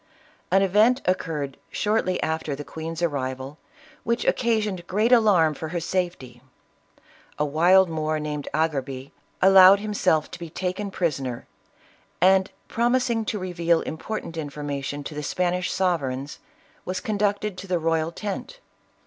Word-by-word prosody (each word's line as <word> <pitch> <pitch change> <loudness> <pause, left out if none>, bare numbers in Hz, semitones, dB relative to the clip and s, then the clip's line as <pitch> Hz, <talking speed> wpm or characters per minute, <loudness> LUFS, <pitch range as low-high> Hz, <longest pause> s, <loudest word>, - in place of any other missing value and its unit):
An 195 +2 +4
event 215 +7 +4
occurred 155 -7 -2
shortly 210 -3 0
after 160 -2 -2
the 145 - -7
queen's 160 +4 -6
arrival, 135 -2 -3 0.4
which 235 0 -1
occasioned 210 -7 0
great 215 +6 +1
alarm 200 -10 +5
for 160 - -6
her 170 +2 -3
safety. 165 -9 -3 1.0
A 150 - +1
wild 175 +6 +5
Moor 155 -1 -1
named 150 -1 -4
Agerbi, 140 -4 -2 0.3
allowed 190 +1 +8
himself 190 -7 0
to 180 - -8
be 170 -1 -7
taken 185 +4 -3
prisoner, 140 -10 -2 0.7
and, 190 +2 +4 0.2
promising 240 -1 +1
to 215 - -2
reveal 170 -3 +1
important 165 +3 -5
informa 145 -2 -4
tion 145 +1 -4
to 150 - -7
the 150 - -4
Spanish 180 +4 -1
sovereigns, 145 -7 -1 0.4
was 185 0 -3
conducted 205 0 -1
to 195 - -8
the 180 -1 +1
royal 165 0 0
tent. 210 - -6
175 Hz, 135 wpm, -24 LUFS, 150-195 Hz, 1.0 s, allowed